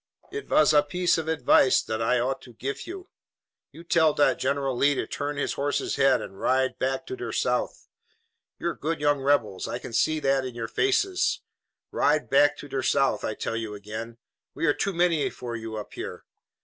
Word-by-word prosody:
"It 425 0 -6
vas 155 - +4
a 150 - +7
piece 175 +4 +1
of 160 - -5
advice 135 -4 +4
dot 110 0 -3
I 120 +2 +2
ought 130 +2 -1
to 120 - -14
gif 135 +5 -5
you. 370 +1 -8 0.6
You 165 - -12
tell 160 -3 +3
dot 145 - +3
General 135 -1 0
Lee 140 +3 +3
to - - -2
turn 145 0 -4
his 145 - -1
horse's 145 +1 -1
head 135 -1 +3
and 95 - -10
ride 130 0 +1
back 135 0 -1
to 385 - -5
der 375 - -5
South. - - -1 0.7
You 170 - -2
are - - -3
good 160 +2 -3
young 145 -1 +2
rebels. 120 -9 +1
I - - -3
can 120 - -9
see 155 +7 +2
it 155 - -6
by 135 0 +3
your 120 -2 -5
faces. 390 - +1 0.5
Ride 150 +1 +1
back 145 +1 +5
to - - -9
der 135 -1 -2
South, 135 +1 +1
I 110 - -2
tell 115 - -3
you 110 -2 -4
again. 110 +3 -7 0.4
We - - -1
are 145 - +4
too 200 - -1
many 170 -3 +2
for 120 -1 -7
you 110 -1 -6
up 105 -1 -7
here. - - -7
140 Hz, 205 wpm, -26 LUFS, 120-155 Hz, 0.7 s, a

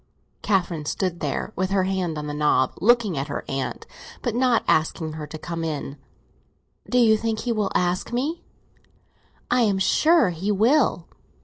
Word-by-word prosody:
Catherine 175 -6 0
stood 175 +2 -2
there, 145 -3 -3
with 185 +1 -1
her 195 -1 +2
hand 185 -4 -2
on 150 - -4
the 150 - -4
knob 150 -3 +2
looking 215 - +3
at 140 - -3
her 145 - -5
aunt, 135 -1 -4 0.4
but 240 - -1
not 245 -1 +2
asking 160 0 +1
her 155 -1 -6
to 155 - -8
come 165 +1 -5
in. 150 -3 -4 0.9
"Do 250 - +1
you 225 -3 +5
think 220 0 -2
he 240 - -2
will 210 -3 -1
ask 180 +3 0
me?" 285 +8 -2 1.1
"I 250 0 +4
am 205 -4 +2
sure 310 - +3
he 180 +5 -2
will. 220 - +2
190 Hz, 170 wpm, -23 LUFS, 160-230 Hz, 1.1 s, you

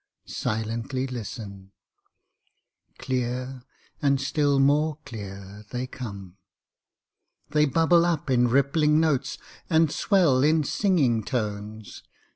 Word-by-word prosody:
Silently 115 +4 -3
listen! 105 -6 -8 1.2
Clear, 125 0 -3 0.4
and 140 -2 +2
still 140 0 +1
more 150 +3 +2
clear, 100 -2 -9
they 125 +1 -3
come. 100 -8 -8 1.1
They 150 0 +4
bubble 165 +4 +4
up 170 -4 -1
in 125 -2 +3
rippling 145 +4 +3
notes, 155 -5 0 0.3
and 160 -3 +3
swell 170 -11 +3
in 155 +1 +3
singing 140 - +1
tones. 105 -2 -5
130 Hz, 95 wpm, -25 LUFS, 110-150 Hz, 1.2 s, They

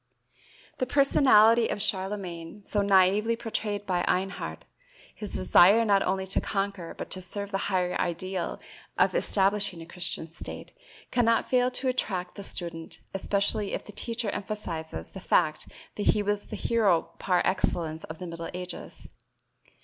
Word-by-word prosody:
The 255 - 0
personality 235 -5 +5
of - - -3
Charlemagne, 190 -2 -3
so 205 - 0
naïvely 200 +3 +4
portrayed 210 -3 -3
by 180 -2 0
Einhard, 190 +1 -1 0.5
his 210 - -4
desire 200 +5 +6
not 200 -2 +4
only 190 0 0
to 190 - 0
conquer 195 -4 -3
but - - -7
to 185 - -1
serve 200 +3 -4
the 195 - 0
higher 180 -2 +1
ideal 185 +1 -2 0.4
of - - +4
establishing 200 - +1
a 165 - -8
Christian 170 -2 -3
state, 170 - -7 0.4
cannot 230 -2 +2
fail 250 -1 +4
to 255 +1 -1
attract 190 -8 -1
the 200 - -8
student, 170 -4 -6
especially 200 +1 0
if - - -3
the - - -10
teacher 230 0 -3
emphasizes 190 -6 -5
the 190 - -8
fact 155 -4 +1 0.3
that 205 - -2
he 210 - +3
was 205 0 -1
the - - -6
hero 200 -8 +2
par 180 -2 +2
excellence 165 -4 0
of 160 - -8
the 180 - -7
middle 170 -1 -6
ages. 180 0 -7
195 Hz, 150 wpm, -28 LUFS, 180-210 Hz, 0.5 s, desire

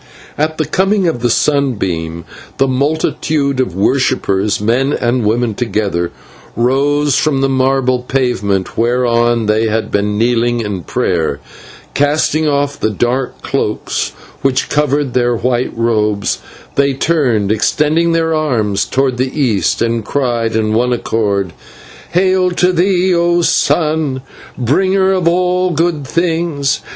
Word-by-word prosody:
At 155 +1 -1
the 155 - 0
coming 190 +4 +1
of 160 -7 -1
the 120 - +1
sunbeam 95 - -1 0.3
the 135 - +2
multitude 140 0 0
of 110 -10 -1
worshippers 105 -3 +1
men 125 +7 +1
and 120 0 0
women 115 +2 +1
together 100 -6 -1 0.5
rose 140 +4 +1
from 140 -3 +1
the 135 - +2
marble 130 -1 +1
pavement 120 -7 -1
whereon 120 -1 +1
they 110 +1 +1
had 110 0 -2
been 105 0 0
kneeling 120 +1 +1
in 105 -4 -4
prayer, 80 -5 0
and, 70 - -12 0.5
casting 150 +2 +1
off 145 0 0
the 110 - +1
dark 120 +5 -2
cloaks - - -2 0.3
which 135 -1 0
covered 145 -2 0
their 120 -1 +1
white 125 +2 -1
robes, 105 -3 0 0.3
they 140 0 +2
turned, 130 -10 +1
extending 155 +9 +1
their 165 -1 +1
arms 115 -11 0
towards 130 -2 0
the 130 +4 -2
east, 115 -8 +1
and 115 -1 -1
cried 120 -3 -1
with 110 -1 0
one 125 +3 +2
accord: 100 -6 -1 0.6
"Hail 185 +1 +3
to 180 +1 +1
thee, 180 +1 +2
O 170 0 +2
sun! 155 -6 +1 0.3
bringer 190 +10 +2
of 185 -3 +1
all 180 +1 +2
good 165 -4 -1
things. 165 -4 0
130 Hz, 135 wpm, -15 LUFS, 115-155 Hz, 0.6 s, Hail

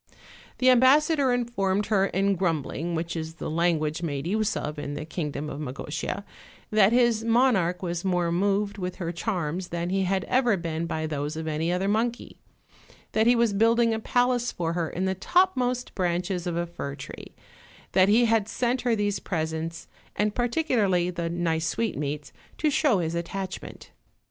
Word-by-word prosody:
The 255 0 +5
ambassador 275 +2 +4
informed 210 -5 0
her 200 -2 +2
in 195 +2 +1
grumbling, 170 -2 -1
which 165 +1 -3
is 160 0 -5
the 165 - -5
language 160 -2 +1
made 145 -4 -3
use 215 +3 0
of 150 0 -4
in 145 0 -4
the 150 - -5
kingdom 150 -3 -4
of 145 - -6
Magotia, 150 +7 -4 0.5
that 215 -1 +5
his 235 -2 +3
monarch 225 -7 +2
was 175 -1 -2
more 180 -3 +1
moved 200 +3 0
with 180 -1 -3
her 170 -2 -3
charms 175 -2 -2
than 170 0 -3
he 195 0 +1
had 190 0 0
ever 245 -5 +2
been 165 -1 -3
by 160 -1 -2
those 150 0 -3
of 160 0 -4
any 160 +2 -1
other 180 +2 0
monkey; 230 +3 -1 0.7
that 220 +1 +2
he 245 - +6
was 230 -3 +2
building 230 +2 +3
a 220 - -1
palace 245 +1 +1
for 170 -1 -2
her 170 -2 -1
in 185 +2 -2
the 190 - +1
topmost 250 - +1
branches 180 0 -1
of 170 -1 -2
a 175 - 0
fir 145 -5 -6
tree; 140 - -10 0.6
that 190 +1 +4
he 235 +3 +5
had 225 -2 +2
sent 245 +2 0
her 240 -2 +2
these 205 -1 0
presents, 160 -1 -3 0.3
and 210 0 +1
par 245 +1 +1
ticularly 205 - +1
the 170 -1 -2
nice 165 -1 0
sweetmeats, 150 -9 -3 0.2
to 305 -1 +1
show 280 -6 +3
his 165 -2 -1
attachment. 185 +3 -5
185 Hz, 175 wpm, -26 LUFS, 165-225 Hz, 0.7 s, he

